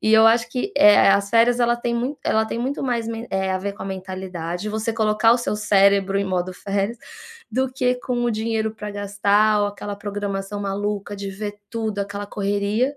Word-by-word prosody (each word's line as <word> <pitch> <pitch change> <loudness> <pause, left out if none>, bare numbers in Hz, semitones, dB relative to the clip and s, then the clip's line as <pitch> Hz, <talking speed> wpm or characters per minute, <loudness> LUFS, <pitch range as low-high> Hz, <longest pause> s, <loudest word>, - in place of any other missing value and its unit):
e 220 - +3
eu 220 0 +7
acho 230 +1 +4
que, 275 +11 -3
eh 210 0 +7
eh, 200 - +6
as 200 0 +2
férias 235 +2 +4
ela 240 0 +3
têm 240 0 -2
mui 250 +5 -2
ela 220 0 +2
tem 225 - -4
muito 265 +4 -2
mais 240 -4 -1
men 230 +1 -5
eh, 190 0 0
a 185 - 0
ver 200 +1 -4
com - - -9
a - - -5
mentalidade, 185 -1 -5
você 220 +1 -2
colocar 220 0 +3
o - - +4
seu 240 - -2
cérebro 200 -2 +3
em 200 - 0
modo 185 -1 -2
férias, 200 +4 -2 0.6
do 260 +2 0
que 255 -1 +1
com 245 -1 -2
o 240 - +1
dinheiro 220 0 -1
para 210 -1 -6
gastar 205 +1 +2
ou 205 - +2
aquela 205 0 -6
programação 200 0 -4
maluca 205 +1 -3
de 200 0 -5
ver 205 +1 -6
tudo, 220 -3 -3
aquela 200 +1 -4
correria, 205 +7 -1
210 Hz, 215 wpm, -22 LUFS, 200-230 Hz, 0.6 s, eu